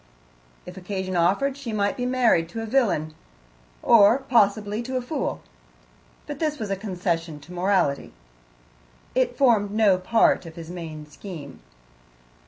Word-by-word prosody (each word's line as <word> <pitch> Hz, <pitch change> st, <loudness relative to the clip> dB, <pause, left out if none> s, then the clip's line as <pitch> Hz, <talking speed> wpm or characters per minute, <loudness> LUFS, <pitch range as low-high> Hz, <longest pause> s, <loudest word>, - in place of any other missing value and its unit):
If 180 Hz, +1 st, -10 dB
occasion 190 Hz, 0 st, -4 dB
offered 200 Hz, +11 st, +2 dB
she 275 Hz, -5 st, -6 dB
might 205 Hz, +3 st, 0 dB
be 250 Hz, -2 st, -2 dB
married 235 Hz, -10 st, +2 dB
to 225 Hz, +6 st, -5 dB
a -, -, -4 dB
villain 215 Hz, -, 0 dB, 0.7 s
or, 225 Hz, +1 st, +6 dB
possibly, 215 Hz, -4 st, +1 dB
to 255 Hz, +2 st, -3 dB
a -, -, -1 dB
fool. 275 Hz, +2 st, -3 dB, 0.8 s
But 290 Hz, -1 st, -7 dB
this 305 Hz, -2 st, -1 dB
was 215 Hz, -6 st, -5 dB
a -, -, +1 dB
concession 175 Hz, -5 st, -3 dB
to 175 Hz, +5 st, -13 dB
morality, 180 Hz, -6 st, 0 dB, 1.0 s
it 255 Hz, -1 st, 0 dB
formed 230 Hz, -7 st, +3 dB
no 205 Hz, -3 st, +3 dB
part 185 Hz, -2 st, +2 dB
of 160 Hz, -, -11 dB
his 165 Hz, 0 st, -9 dB
main 160 Hz, -4 st, -7 dB
scheme. 150 Hz, -2 st, -10 dB
200 Hz, 145 wpm, -24 LUFS, 175-240 Hz, 1.0 s, or